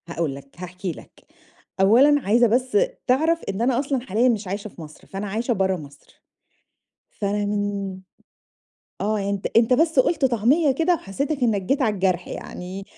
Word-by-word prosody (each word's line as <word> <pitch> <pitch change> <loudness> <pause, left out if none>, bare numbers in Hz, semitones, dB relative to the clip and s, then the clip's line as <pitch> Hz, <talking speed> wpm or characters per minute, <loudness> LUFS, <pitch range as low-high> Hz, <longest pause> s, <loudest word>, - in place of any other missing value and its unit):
هاقول 165 -4 -2
لك 140 0 -12
هاحكي 180 +1 -5
لك، - - -14 0.6
أولًا 270 +9 +5
عايزة 235 +3 +3
بس 250 - +1 0.3
تعرف 320 +6 +2
إن 195 +2 -3
أنا 245 +1 +2
أصلًا 275 -1 -1
حاليًا 240 +1 +1
مش 215 -4 -1
عايشة 200 +3 -4
في 185 - -12
مصر، 155 -1 -13
فأنا 195 +2 -5
عايشة 230 +5 -1
برّا 190 -2 0
مصر، 145 -3 -15 0.9
فر 200 -1 -3
منين 205 -2 -2 1.0
آه، 215 +1 0
يعني 200 0 -2
أنت، 200 -1 -3
أنت 230 +2 +4
بس 320 +2 +2
قُلت 280 +3 +3
طعمية 265 +5 +3
كده 330 +6 +2
وحسّيتك 280 - -3
إنّك 215 -5 +2
جيت 275 +9 0
على 220 -4 +1
الجرح 185 -2 0
يعني 185 +2 -7
210 Hz, 165 wpm, -23 LUFS, 190-260 Hz, 1.0 s, أولًا